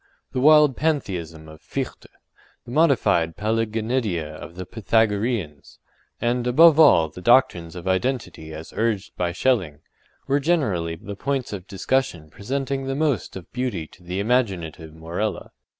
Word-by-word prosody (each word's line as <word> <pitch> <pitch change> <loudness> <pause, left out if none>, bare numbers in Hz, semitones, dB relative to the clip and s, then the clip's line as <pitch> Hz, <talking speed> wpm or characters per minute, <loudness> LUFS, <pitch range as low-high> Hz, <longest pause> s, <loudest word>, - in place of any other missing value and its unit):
The - - -2
wild 150 -1 +6
Pantheism 90 - -2
of 80 0 -13
Fichte; - - -5 0.6
the 120 - -10
modified 130 - +2
Paliggenedia 110 -5 -1
of 75 +2 -10
the 90 0 -6
Pythagoreans; 105 - -1 0.4
and, 120 +1 0
above 160 +5 +6
all, 85 - +7
the 90 - -11
doctrines 90 -8 +3
of 90 +1 -7
Identity 95 -5 -2
as 80 +1 -9
urged 110 -4 -1
by 90 -1 -1
Schelling, 90 - 0 0.4
were 140 +1 +1
generally 105 - 0
the 100 +5 -8
points 135 +1 -2
of 95 -2 -7
discussion 95 - -1
presenting 135 +4 -3
the 135 - -2
most 145 -4 -1
of 95 -3 -10
beauty 125 -10 -2
to - - -19
the 90 +2 -4
imaginative 95 -9 -1
Morella. 85 +7 -4
105 Hz, 140 wpm, -23 LUFS, 85-130 Hz, 0.6 s, all